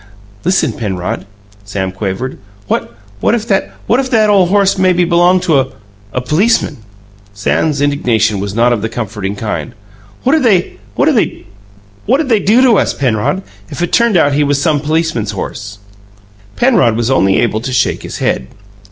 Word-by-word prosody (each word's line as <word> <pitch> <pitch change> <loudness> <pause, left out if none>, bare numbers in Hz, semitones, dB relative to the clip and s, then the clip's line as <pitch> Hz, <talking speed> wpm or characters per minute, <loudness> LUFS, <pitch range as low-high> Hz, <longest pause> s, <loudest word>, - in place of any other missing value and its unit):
"Listen, 165 -7 +1
Penrod," 100 0 -4 0.4
Sam 100 -2 -3
quavered: 100 +7 -4 0.3
"What - - -2 0.3
what 225 - +2
if 230 -1 -4
that 195 -2 0
what 240 - +2
if 265 -1 -1
that 215 -4 +3
ole 190 -3 +4
horse 195 +1 +3
maybe 180 -1 +3
b'longed 175 +1 +3
to 155 -5 +3
a 105 -1 -6
policeman!" 155 - +1 0.6
Sam's 140 +8 0
imagination 115 -7 +1
was 100 0 -4
not 120 +1 +3
of 110 - -2
the 110 - -2
comforting 105 -3 -4
kind. 110 +3 -4 0.5
"What'd 305 +5 +3
they 200 -8 +1 0.2
do 105 - 0
to 240 -5 +5
us, - - 0
Penrod, 130 - 0 0.3
if 175 - -4
it 175 - -3
turned 235 -5 +3
out 145 -3 +3
he 145 +1 +2
was 145 -1 +1
some 150 0 +1
policeman's 150 -8 -1
horse?" 100 +2 -6 0.8
Penrod 225 - +3
was 120 +2 0
able 135 - +3
only 95 +5 +3
to 130 - -4
shake 125 - 0
his - - -7
head. 65 - -1
135 Hz, 155 wpm, -14 LUFS, -, 0.8 s, to